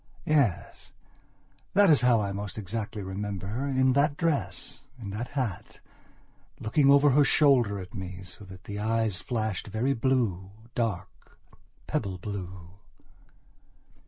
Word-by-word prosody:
Yes, 140 -12 0 0.8
that 200 -3 +6
is 145 - +5
how 120 -3 +4
I 100 -1 -2
most 100 +2 -5
exactly 105 0 -4
remember 95 0 -4
her, 120 +8 -3
in 130 -1 +3
that 140 +1 +2
dress, 165 -4 -1 0.2
in 100 -4 -6
that 110 +4 -4
hat, 115 -9 -3 0.8
looking 135 +6 +2
over 140 +1 +6
her 145 +3 +5
shoulder 130 -8 +4
at 95 +3 -8
me 95 -3 -6
so 90 +2 -11
that 95 0 -12
the 100 0 -6
eyes 110 -2 0
flashed 110 -7 -2
very 110 +6 0
bluedark 110 -4 -2 0.5
pebble 95 -2 -2
blue... 90 -2 -7
110 Hz, 130 wpm, -28 LUFS, 95-130 Hz, 0.8 s, that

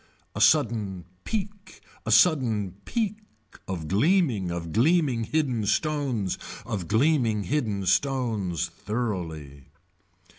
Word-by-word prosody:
A - - -4
sudden 110 - +2 0.2
peak 205 -2 -5 0.3
a - - 0
sudden 115 - +3
peak 215 -3 -1 0.5
of 85 -4 -4
gleaming 115 - +2
of 85 -1 -4
gleaming 130 - +2
hidden 130 -5 0
stones 135 - 0 0.3
of 105 -7 -4
gleaming 115 -3 +2
hidden 110 -7 -1
stones 105 - 0
thoroughly. 85 - -5
115 Hz, 100 wpm, -26 LUFS, 95-150 Hz, 0.5 s, sudden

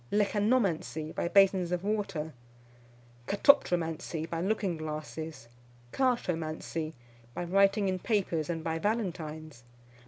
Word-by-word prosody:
Lecanomancy, 205 -7 +1
by - - -1
basins 190 -1 +4
of 180 0 -1
water. 195 -7 -2 0.9
Katoptromancy, 170 - +2
by 165 0 -3
looking 195 -2 0
glasses. 155 -2 -6 0.5
Chartomancy, 165 -10 -1 0.4
by - - -2
writing 195 +3 +3
in 185 -1 0
papers, 180 -8 0
and 165 -2 -2
by 160 0 -1
Valentines. 160 - -3
175 Hz, 100 wpm, -30 LUFS, 160-200 Hz, 0.9 s, basins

